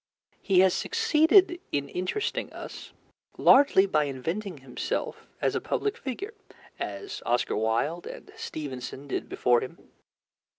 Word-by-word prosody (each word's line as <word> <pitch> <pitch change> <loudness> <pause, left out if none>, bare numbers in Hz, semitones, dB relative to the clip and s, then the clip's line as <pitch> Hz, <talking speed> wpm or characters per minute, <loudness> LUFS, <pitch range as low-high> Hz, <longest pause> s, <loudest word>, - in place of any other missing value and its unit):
He 185 -2 +4
has 190 -1 +5
succeeded 370 -4 +4
in 140 -1 -1
interesting 185 - -2
us - - -9 0.5
largely 265 -8 +6
by 155 -6 +2
inventing 165 +8 -4
himself 135 -2 -4
as - - +1
a - - -1
public 415 -1 -1
figure, 385 - -5 0.5
as 400 - -5
Oscar 120 0 0
Wilde 115 +10 0
and - - -9
Stevenson 140 -1 -6
did - - -3
before 120 -1 +3
him. 130 - -7
175 Hz, 125 wpm, -27 LUFS, -, 0.5 s, largely